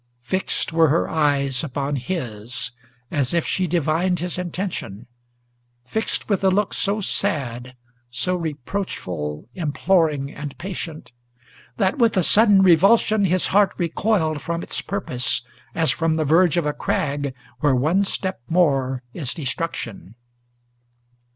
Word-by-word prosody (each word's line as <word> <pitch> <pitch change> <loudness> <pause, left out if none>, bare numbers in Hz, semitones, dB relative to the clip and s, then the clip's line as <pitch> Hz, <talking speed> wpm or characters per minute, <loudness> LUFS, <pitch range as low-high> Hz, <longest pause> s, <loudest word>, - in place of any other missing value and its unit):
Fixed 185 +3 -1
were 165 -1 +5
her 160 +4 +2
eyes 140 -4 +1
upon 140 -1 -2
his, 125 - -4 0.4
as 140 +1 0
if 170 - +1
she 185 -1 0
divined 170 +2 +1
his 175 +1 -2
intention, 175 - -4 0.8
Fixed 220 - -2
with 200 -3 0
a 190 - +5
look 200 +2 +1
so 205 +2 0
sad, 125 - -1 0.3
so 125 +9 -1
reproachful, 125 - -4
imploring, 155 -3 +1
and 145 -1 -7
patient, 170 -7 -6 0.7
That 195 +3 +1
with 230 -4 +3
a 185 - +4
sudden 205 0 +6
revulsion 200 +4 +5
his 185 0 +2
heart 205 0 +4
recoiled 170 -3 0
from 170 +4 -3
its - - -3
purpose, 130 -13 -2 0.3
As 160 -5 +3
from 160 +3 0
the 155 -1 0
verge 170 +3 +4
of 170 - +1
a 150 - 0
crag, 140 -3 -2 0.2
where 145 -4 +3
one 155 +10 +2
step 190 -7 -2
more 135 -7 +2
is 140 -7 -1
destruction. 130 - -4
160 Hz, 130 wpm, -22 LUFS, 135-185 Hz, 0.8 s, sudden